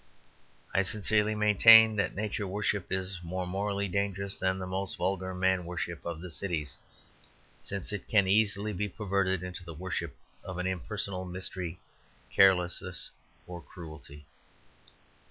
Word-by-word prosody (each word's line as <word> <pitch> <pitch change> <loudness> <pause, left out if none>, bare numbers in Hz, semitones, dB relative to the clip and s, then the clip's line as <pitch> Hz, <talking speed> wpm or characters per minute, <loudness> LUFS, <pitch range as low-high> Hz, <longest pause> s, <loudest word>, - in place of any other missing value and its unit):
I 95 - +4
sincerely 105 +2 +1
maintain 110 +1 +8
that 100 - 0
Nature 105 0 -2
worship 100 0 -1
is 95 -1 -2
more 90 +2 -3
morally 100 +2 -1
dangerous 100 +1 -2
than 95 0 0
the 95 - -4
most 95 +1 -2
vulgar 95 +1 -2
man 95 0 +2
worship 85 -1 -5
of 85 -1 -4
the 90 -1 -8
cities; 80 -5 -3 0.9
since 100 +1 -3
it 105 - -5
can 100 -3 +4
easily 105 +1 +2
be 105 +2 -2
perverted 95 -2 0
into 90 0 -6
the 85 -2 -9
worship 85 -2 -4 0.3
of 95 -2 -6
an 90 - -2
impersonal 95 0 -3
mystery, 90 -1 -4 0.5
carelessness, 90 -2 +3 0.3
or 90 -1 -8
cruelty. 75 -3 -11
95 Hz, 135 wpm, -30 LUFS, 90-100 Hz, 0.9 s, maintain